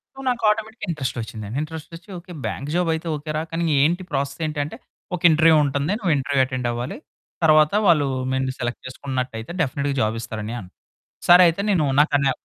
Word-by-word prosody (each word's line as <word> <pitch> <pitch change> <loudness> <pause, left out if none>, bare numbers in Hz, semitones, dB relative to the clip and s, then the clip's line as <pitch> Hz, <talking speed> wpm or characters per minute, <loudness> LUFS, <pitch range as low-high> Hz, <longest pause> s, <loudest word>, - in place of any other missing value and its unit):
So - - -12
నాకు 240 -2 -2
ఆటోమేటిక్‌గా 220 -1 -2
interest 135 -5 -3
వచ్చిందండి. 110 +2 -6
ఇంట్రెస్ట్ 160 +1 -7
వచ్చి. 175 +5 -14
ఓకే. 180 +1 -14
బ్యాంక్ 140 +2 -4
జాబ్ 175 -2 +1
అయితే 160 +1 -4
ఓకే. 150 +1 -8
రా - - 0
కానీ 165 +1 -1 0.2
ఏంటి 175 +5 +2
ప్రాసెస్ 140 +2 -2
ఏంటి 150 -1 -3
అంటే. 150 - -7 0.4
ఒక 175 - -8
ఇంటర్వ్యూ 160 +1 +5
ఉంటుంది. 140 +5 -1
నువ్వు 180 -7 +1
ఇంటర్వ్యూ 135 0 +1
అటెండ్ 130 -2 -3
అవ్వాలి. 120 - -4 0.5
తరువాత 155 -1 +5 0.2
వాళ్ళు 150 -5 +4 0.3
నిన్ను 130 0 0
సెలెక్ట్ 120 0 -3
చేసుకున్నట్టయితే 130 -1 -4
డెఫినిట్‌గా 140 0 -1
జాబ్ 110 +1 0
ఇస్తారు 110 -1 -6
అన్నయ్య 120 +3 -4
అన్నాడు. 90 - -15 0.5
సరే 180 +1 +9
అయితే 170 +4 0
నేను 170 -7 +3
నాకన్నా 145 -3 +3
145 Hz, 190 wpm, -22 LUFS, 130-165 Hz, 0.5 s, సరే